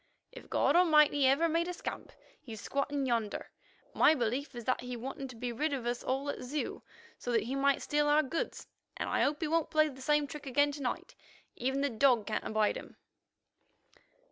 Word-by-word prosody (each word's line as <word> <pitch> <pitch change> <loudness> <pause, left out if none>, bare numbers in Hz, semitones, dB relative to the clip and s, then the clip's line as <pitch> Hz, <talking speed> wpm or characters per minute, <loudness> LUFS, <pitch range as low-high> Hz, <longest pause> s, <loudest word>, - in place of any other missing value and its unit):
"If - - -12
God - - +2
Almighty 300 -5 +5
ever 280 +6 +4
made 335 +1 0
a 360 - -3
scamp, - - -6 0.3
he's 225 -4 -9
squatting 280 +3 -2
yonder. 230 -4 -2 0.4
My 315 - +5
belief 255 +2 -2
is 240 -2 -7
that 255 - 0
he 250 0 -5
wanted 270 +2 -6
to 255 - -10
be 245 +1 -4
rid 290 +5 -1
of 260 -4 -3
us 240 0 -2
all 270 +2 -1
at - - -8
Zeu, 275 +4 -4 0.4
so 245 - -4
that 230 -3 +2
he 245 +4 -4
might 275 0 +2
steal 295 0 +1
our 300 +1 +4
goods, 320 +5 -4 0.3
and - - -3
I - - +1
hope 295 +1 +1
he 320 - 0
won't 325 0 +1
play 310 0 +3
the 265 -2 -11
same 295 +2 +2
trick 290 0 -9
again 285 +3 +3
to 285 0 -7
night. 250 - -3 0.4
Even 265 +3 -1
the 285 - +1
dog 240 -2 +3
can't 215 - -2
abide 215 -1 +1
him." - - -11
275 Hz, 205 wpm, -32 LUFS, 245-295 Hz, 0.4 s, Almighty